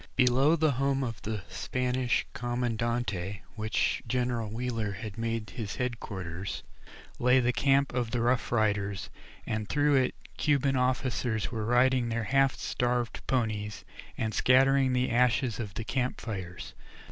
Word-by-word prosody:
Below 130 +5 +4
the 160 -1 +3
former 125 - -4
home 135 0 +1
of 115 -4 -4
the 105 -2 -4
Spanish 125 +6 -1
comandante, 115 -5 -2
which 110 -1 0
General 120 -2 -1
Wheeler 115 -2 -2
had 105 0 -7
made 115 -1 -3
his 110 -5 -5
head 125 -2 -2
quarters, 95 -1 -5 0.6
lay 125 +2 +5
the 125 0 +2
camp 135 0 +2
of 120 -2 -1
the 120 - -1
Rough 120 +1 +1
Riders, 105 -3 0 0.3
and 110 -1 -3
through 145 0 +3
it 130 - +1 0.2
Cuban 140 -2 +2
officers 125 -3 0
were 110 -3 -3
riding 125 0 +3
their 115 0 -1
half 135 +3 +3
starved 120 -1 -1
ponies, 105 -5 -1 0.3
and 110 -1 -1
scattering 135 +1 +4
the 125 0 +1
ashes 120 0 +2
of 105 -4 -5
the 115 - -3
camp 125 +2 -1
fires. 95 -6 -6
120 Hz, 145 wpm, -29 LUFS, 110-130 Hz, 0.6 s, lay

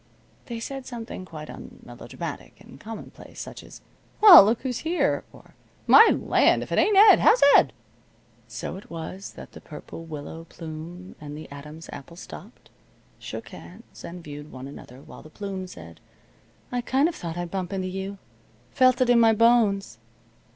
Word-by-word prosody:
They 235 -2 -5
said 270 +3 -7
something 230 -6 -7
quite 155 -3 -9
unmelodramatic, - - -9
and 135 - -15
commonplace, 225 +6 -10
such - - -8
as: - - -14 0.4
"Well, 400 - +11
look 225 +3 +1
who's 250 -3 -3
here!" 335 +2 0
or, - - -18 0.3
"My 450 - +8
land! - - +2
If - - -12
it - - +2
ain't 415 -2 +3
Ed! 425 +2 +8
How's 455 +2 +5
Ed?" 135 - +5 0.8
So 115 +10 -6
it 195 - -13
was 170 +4 -7
that - - -12
the - - -13
Purple 165 - -10
Willow 160 +1 -8
Plume 165 +3 -9
and 150 0 -8
the 155 - -9
Adam's 150 +3 -10
Apple 145 +4 -11
stopped, 210 +5 -12 0.5
shook - - -8
hands, - - -13
and 175 0 -9
viewed 145 0 -10
one 130 +1 -9
another 135 -2 -12
while - - -13
the 155 - -14
Plume 190 +1 -6
said, 85 - -12 0.7
"I 245 0 -1
kind 265 +5 +2
of 345 - -3
thought 170 - -6
I'd 175 -1 -5
bump 185 -2 -4
into 190 -1 -3
you. 195 +2 -5 0.5
Felt 255 -1 +3
it 250 - +3
in 240 - +5
my 225 -1 +5
bones." 210 - +2
185 Hz, 170 wpm, -25 LUFS, 155-235 Hz, 0.8 s, Well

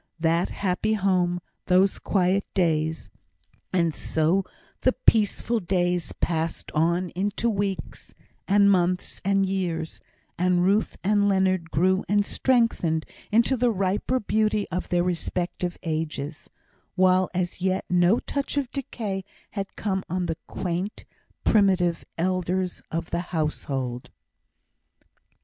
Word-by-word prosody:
That 165 +2 +2
happy 200 +3 0
home 180 -3 +1 0.3
those 185 +2 +3
quiet 190 0 +1
days! 160 - 0 0.6
And 170 -3 +2
so 160 +7 +1 0.4
the 255 - +3
peaceful 225 +2 +2
days 175 -2 0
passed 165 -1 -2
on 170 +3 +1
into 200 +5 -1
weeks, 200 -3 -3 0.3
and 200 0 +5
months, 180 -1 0
and 195 0 +2
years, 175 -4 -2 0.4
and 180 0 +3
Ruth 200 +4 +2
and 205 +1 +3
Leonard 185 -3 +1
grew 185 +5 +2
and 205 0 +3
strengthened 230 -13 +1 0.3
into 230 +5 +4
the 245 0 +2
riper 200 +5 0
beauty 215 -1 +1
of 180 0 -3
their 175 -1 +2
respective 175 0 -2
ages; 155 -2 -4 0.5
while 185 0 +4
as 180 0 -2
yet 190 0 0
no 180 +4 +4
touch 280 +2 -3
of 270 -3 -1
decay 215 -8 -4 0.3
had 195 -2 -5
come 190 -2 -1
on 180 +1 -1
the 165 -2 -2
quaint, 185 +3 -3 0.4
primitive 185 -5 +3
elders 185 +1 -1
of 165 0 -4
the - - 0 0.2
household. 135 -5 -2
185 Hz, 120 wpm, -25 LUFS, 175-200 Hz, 0.6 s, and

